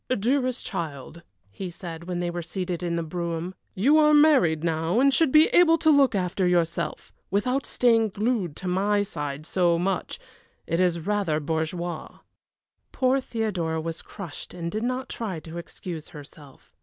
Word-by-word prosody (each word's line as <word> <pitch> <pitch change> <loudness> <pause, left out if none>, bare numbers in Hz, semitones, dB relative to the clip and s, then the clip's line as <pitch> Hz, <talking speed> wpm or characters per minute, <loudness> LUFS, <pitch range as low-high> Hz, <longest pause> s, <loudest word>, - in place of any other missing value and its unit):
"Dearest 255 +3 0
child," 165 -3 -5 0.3
he 185 - -6
said, 170 -1 -8
when 180 -1 -3
they 175 -1 -1
were 175 0 -4
seated 180 +1 -4
in 170 -1 -1
the 170 - -1
brougham, 170 +1 -4 0.2
"you 280 +11 +4
are 300 0 +5
married 265 - +4
now 165 +5 +1
and 275 +1 +4
should 315 -1 +3
be 310 +2 +7
able 330 -2 +5
to 315 -1 +4
look 275 -6 +4
after 185 0 0
yourself, 170 -2 -1 0.2
without 250 +7 0
staying 225 -3 +3
glued 205 -6 -1
to 185 - -6
my 205 +3 +2
side 145 -5 -5
so 175 -1 +2
much 185 +1 -2 0.5
it 165 - -1
is 175 -2 +2
rather 195 -4 0
bourgeois." 160 +2 -3 0.7
Poor 260 +1 +2
Theodora 190 -10 -2
was 165 +1 -5
crushed 185 -4 -9
and 170 -1 -4
did 215 - -2
not 255 +2 -2
try 200 -8 -4
to 165 +2 -7
excuse 170 -2 -7
herself. 145 -2 -14
180 Hz, 165 wpm, -25 LUFS, 165-230 Hz, 0.7 s, be